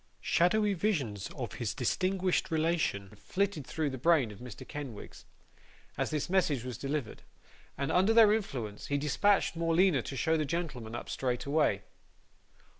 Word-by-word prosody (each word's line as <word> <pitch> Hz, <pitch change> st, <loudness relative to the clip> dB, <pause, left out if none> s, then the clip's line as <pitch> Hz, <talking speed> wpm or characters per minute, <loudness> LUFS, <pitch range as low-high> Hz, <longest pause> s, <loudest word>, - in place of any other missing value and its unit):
Shadowy 205 Hz, +4 st, +2 dB
visions 145 Hz, -, -1 dB
of -, -, -4 dB
his -, -, -2 dB
distinguished 185 Hz, -1 st, 0 dB
relation 160 Hz, -, 0 dB
flitted 190 Hz, -, -2 dB
through 155 Hz, -3 st, -1 dB
the 130 Hz, -, -6 dB
brain 150 Hz, -6 st, +3 dB
of 100 Hz, -, -12 dB
Mr. 125 Hz, -4 st, -9 dB
Kenwigs, 135 Hz, -8 st, -8 dB, 0.7 s
as -, -, -1 dB
this 150 Hz, -2 st, -2 dB
message 170 Hz, -9 st, +1 dB
was 125 Hz, -2 st, -6 dB
delivered; 140 Hz, -3 st, -3 dB, 0.6 s
and 140 Hz, 0 st, -1 dB
under 190 Hz, +4 st, +4 dB
their 225 Hz, -2 st, +7 dB
influence, 120 Hz, -, -3 dB
he 145 Hz, -, 0 dB
dispatched 165 Hz, +8 st, +2 dB
Morleena 165 Hz, -2 st, +3 dB
to 135 Hz, -, -6 dB
show 160 Hz, +7 st, +2 dB
the 155 Hz, -, +1 dB
gentleman 135 Hz, -8 st, -4 dB
up -, -, -6 dB
straightway. 130 Hz, -4 st, 0 dB
150 Hz, 145 wpm, -31 LUFS, 125-180 Hz, 0.7 s, their